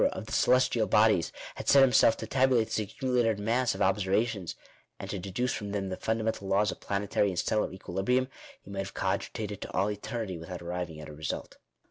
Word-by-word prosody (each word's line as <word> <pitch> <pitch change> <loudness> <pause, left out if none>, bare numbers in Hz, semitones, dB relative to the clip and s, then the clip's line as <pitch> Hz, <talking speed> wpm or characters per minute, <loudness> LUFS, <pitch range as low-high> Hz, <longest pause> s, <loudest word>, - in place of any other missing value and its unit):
of - - -6
the - - -10
celestial 125 -3 +3
bodies, 105 -4 +4 0.2
had - - -4
set 140 -1 +8
himself 120 -3 +5
to - - -5
tabulate 130 -2 +2
this 110 - 0
accumu 125 +3 0
lated 110 -2 +1
mass 115 +4 +1
of - - 0
observations, 100 0 0 0.4
and - - -6
to 100 - -3
educe 100 +7 -2
from 105 -1 -5
them 100 -2 -2
the 95 - -3
funda 110 +2 -1
mental 110 -3 -2
laws 100 +1 +2
of - - -9
planetary 100 +1 0
and 95 -3 -3
stellar 110 - 0
equilibrium, 110 +7 -1 0.3
he 100 - -14
might 100 - -4
have 95 0 -5
cogitated 100 +2 -2
to - - -6
all 100 +3 +1
eternity 105 -3 -4
without 90 +1 -7
arriving 85 -2 -4
at 75 - -8
a 75 - -9
result. 75 0 -5
105 Hz, 205 wpm, -29 LUFS, 95-115 Hz, 0.4 s, set